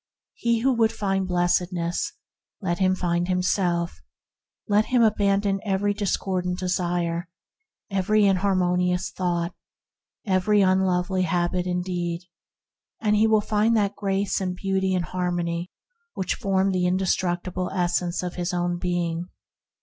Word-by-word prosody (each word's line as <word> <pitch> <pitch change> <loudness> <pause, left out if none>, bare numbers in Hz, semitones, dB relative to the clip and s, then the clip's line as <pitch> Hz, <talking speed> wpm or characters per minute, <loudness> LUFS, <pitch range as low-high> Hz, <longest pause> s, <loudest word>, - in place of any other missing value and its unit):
He 235 -1 0
who 265 +2 +3
would 225 -2 +3
find 195 -4 -1
Blessedness, 175 -1 0 0.5
let 175 -3 -2
him 185 -1 +3
find 175 -1 0
himself; 180 -2 0 0.7
let 210 0 +3
him 245 -2 +3
abandon 200 -2 +2
every 205 0 +1
discordant 185 -3 -1
desire, 175 -2 -1 0.6
every 205 +2 +3
inharmonious 180 -1 +1
thought, 175 -1 -1 0.7
every 200 +1 +3
unlovely 185 -1 +2
habit 175 +1 0
and 180 0 -1
deed, 175 -1 -3 0.8
and 210 -1 +2
he 215 +1 +4
will 220 -1 +4
find 215 +2 +2
the 205 -1 +1
Grace 195 0 -1
and 180 -1 -2
Beauty 190 0 0
and 180 -1 0
Harmony 175 0 -2 0.5
that 185 - -1
form 195 0 +1
the 180 -1 +1
indestructible 180 0 0
essence 175 -1 0
of 180 -1 -3
his 180 +1 -2
own 175 0 -1
being. 175 -1 -2
185 Hz, 125 wpm, -25 LUFS, 175-195 Hz, 0.8 s, he